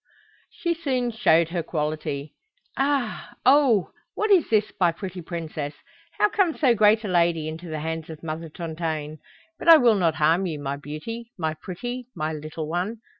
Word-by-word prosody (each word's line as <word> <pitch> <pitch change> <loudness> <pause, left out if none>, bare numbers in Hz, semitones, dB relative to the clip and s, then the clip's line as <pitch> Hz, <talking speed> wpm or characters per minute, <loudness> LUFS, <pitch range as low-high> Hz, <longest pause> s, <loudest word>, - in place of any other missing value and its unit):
She 340 -1 -2
soon 260 -7 -1
showed 170 -8 +3
her 170 0 -1
quality. 150 -2 -3 0.4
"Aha! 270 -5 -1
oho! 260 -7 +5 0.2
What 430 0 0
is 370 -5 +5
this, 215 -1 +2
my 175 -3 +4
pretty 185 +1 -7
princess? 155 -4 -5 0.4
How 420 - +5
comes 390 -5 +1
so 265 -6 +5
great 215 0 +4
a - - -2
lady 170 -3 +2
into 165 +2 -7
the 155 -1 -4
hands 160 0 -4
of 160 0 -9
Mother 160 0 -5
Tontaine? 155 -2 -4 0.4
But - - -7
I 330 - +11
will 240 -5 +5
not 165 -3 +2
harm 165 +5 +2
you, 160 -3 -3
my 140 -1 -3
beauty, 190 +12 -7
my 160 -3 -1
pretty, 240 +10 -6
my 155 +1 -2
little 155 +1 -6
one. 185 +8 -3
170 Hz, 175 wpm, -25 LUFS, 155-235 Hz, 0.4 s, I